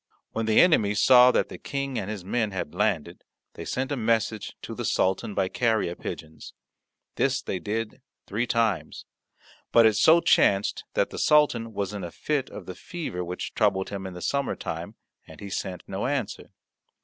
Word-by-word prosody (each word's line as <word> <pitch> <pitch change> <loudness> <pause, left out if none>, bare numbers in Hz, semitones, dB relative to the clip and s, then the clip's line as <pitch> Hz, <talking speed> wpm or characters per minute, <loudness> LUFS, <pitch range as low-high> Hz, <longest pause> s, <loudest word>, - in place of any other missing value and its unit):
When 115 0 -2
the 110 - +5
enemy 110 - +4
saw 125 +3 +7
that - - +1
the - - -9
King 140 -3 -3
and 95 - -5
his 105 -4 -6
men 110 +2 0
had 90 -5 -5
landed, 85 -3 -1 0.3
they - - -8
sent 130 +2 -2
a - - +1
message 110 -2 -1
to - - -6
the - - -5
Sultan 95 +2 0
by 95 - +1
carrier 110 -4 0
pigeons; 80 -2 -8 0.6
this - - +2
they 95 - -4
did 105 +5 -4 0.2
three 115 +4 -2
times. 115 -7 -1 0.7
But 115 -1 +6
it 110 - +5
so 160 +11 +6
chanced 100 -10 +2
that - - +1
the - - -6
Sultan 135 -7 +3
was 100 -1 -3
in 100 -2 -5
a 85 - -4
fit 140 - -2
of - - -9
the 90 - -6
fever 120 - -5
which 90 +1 -5
troubled 95 -3 +1
him 100 -1 -5
in 90 - -8
the 90 - -7
summer 140 -1 0
time, - - -6 0.3
and - - -13
he 100 -1 -8
sent 95 -2 -4
no 95 +5 -3
answer. 135 -6 -3
105 Hz, 185 wpm, -26 LUFS, 95-125 Hz, 0.7 s, saw